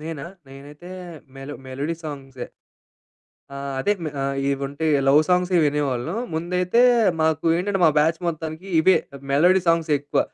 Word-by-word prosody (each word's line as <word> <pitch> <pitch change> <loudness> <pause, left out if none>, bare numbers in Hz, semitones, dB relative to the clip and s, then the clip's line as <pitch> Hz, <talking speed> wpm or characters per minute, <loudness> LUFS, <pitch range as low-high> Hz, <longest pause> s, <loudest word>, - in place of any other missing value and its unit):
నేనా? 155 -2 -6 0.2
నేనైతే 145 +6 -12 0.5
melo 135 +2 -8
melody 140 +5 -3
సాంగ్సే. 135 -4 -7 1.1
ఆ! - - -6 0.2
అదే 205 +9 +2
మె 155 - -3
ఆహ్, 135 0 -2 0.2
ఇవుంటే 140 +3 -3 0.2
లవ్ 145 +3 +6
సాంగ్స్ 180 0 +2
వినేవాళ్ళం. 145 - -1 0.2
ముందైతే 180 +6 0 0.4
మాకు 160 -1 +1
ఏంటంటే, 195 +2 -1
మా 160 - +6
బ్యాచ్ 160 +2 +2
మొత్తానికి 160 +2 -5
ఇవే. 190 +4 +5 0.3
మెలోడీ 175 +7 +4
సాంగ్స్ 165 -2 +2
ఎక్కువ 145 +1 -1
155 Hz, 135 wpm, -22 LUFS, 140-175 Hz, 1.1 s, లవ్